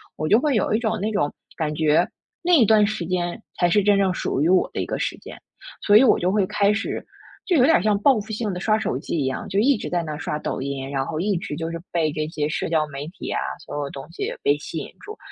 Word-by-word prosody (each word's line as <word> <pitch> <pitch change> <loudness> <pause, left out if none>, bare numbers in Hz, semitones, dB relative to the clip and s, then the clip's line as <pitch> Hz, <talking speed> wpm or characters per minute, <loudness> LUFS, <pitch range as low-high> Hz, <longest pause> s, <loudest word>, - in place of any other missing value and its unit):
我 155 - -3
就 215 - +6
会 290 +1 +1
有 215 - +1
一 - - +1
种 225 -2 -1
那 215 +2 -1
种 145 -9 0 0.2
感 155 -2 -1
觉， 155 0 +3 0.4
那 355 +1 +2
一 295 -8 +7
段 215 0 +5
时 215 -3 -3
间 180 +3 -2 0.2
才 175 - +4
是 205 +4 +3
真 205 0 +4
正 195 -2 +2
属 140 - -2
于 - - +3
我 185 0 +3
的 - - -1
一 - - -1
个 - - -3
时 - - -2
间， - - -11 0.5
所 205 0 +6
以 235 - +7
我 255 - +5
就 180 +1 +1
会 205 -1 +2
开 200 +1 +2
始 220 +1 -2 0.4
就 355 - +2
有 250 - +5
点 310 - +4
像 210 -1 +2
报 270 +7 +5
复 220 - -9
性 215 -2 -2
地 180 - -4
刷 215 +2 +2
手 130 - -1
机 145 - -4
一 140 - 0
样， 130 0 -3
就 195 - +1
一 270 +6 +4
直 - - -5
在 175 -1 0
那 155 -2 -5
刷 150 -1 -3
抖 - - -3
音， 135 0 -4
然 135 -1 -1
后 155 +2 -4
一 200 +3 0
直 160 -3 -5
就 165 0 -3
是 165 - -4
被 165 -3 +1
这 155 +1 -2
些 150 -2 -2
社 155 - -2
交 155 -2 +1
媒 140 0 -6
体 185 - -8
啊， - - 0 0.2
所 - - -9
有 145 -1 -3
东 135 +1 -8
西 - - -3
被 145 - +4
吸 155 +2 -7
引 140 - -6
住。 430 +1 -9
180 Hz, 300 characters per minute, -23 LUFS, 155-215 Hz, 0.5 s, 一